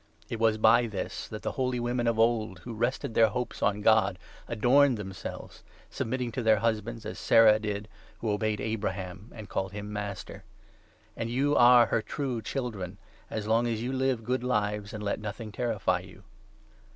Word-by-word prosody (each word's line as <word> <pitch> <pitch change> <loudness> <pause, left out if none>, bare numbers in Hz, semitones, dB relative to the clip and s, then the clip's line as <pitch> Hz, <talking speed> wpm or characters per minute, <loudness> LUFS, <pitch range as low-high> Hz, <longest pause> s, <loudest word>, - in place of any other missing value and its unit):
It 115 - -4
was 110 -1 +3
by 120 +2 +5
this 100 -4 -5
that 110 - -8
the - - -1
holy 125 -2 -1
women 120 0 -1
of 115 -1 +1
old, 115 -4 +2
5 85 - -18
who 120 - -6
rested 120 +1 -1
their 115 0 +5
hopes 125 +4 -4
on 105 +1 +1
God, 105 -3 +4 0.3
adorned 125 +3 +4
themselves; 95 -3 -7 0.3
submit 125 +3 -2
ting 120 -1 -2
to 125 - -3
their 110 -2 +4
husbands, 115 +1 -2
as - - -6
Sarah 110 -1 +6
did, 105 -1 -4 0.3
who 110 - -2
obeyed 105 0 0
Abraham, 100 -3 -4
6 - - -15
and 110 -2 -8
called 95 0 -2
him 105 0 -6
master. 100 -2 -6 0.7
And 115 - -3
you 140 +4 +1
are 120 0 +7
her 115 - 0
true 130 -2 -3
children, 105 -7 -4 0.3
as 110 -1 -4
long 115 +2 +2
as 115 -1 -2
you 130 +2 -2
live 130 -3 0
good 125 +2 -1
lives, 105 -3 -1
and 105 -3 -6
let 100 - -1
nothing 110 +1 -6
terrify 115 -3 0
you. - - -14
110 Hz, 190 wpm, -28 LUFS, 105-120 Hz, 0.7 s, are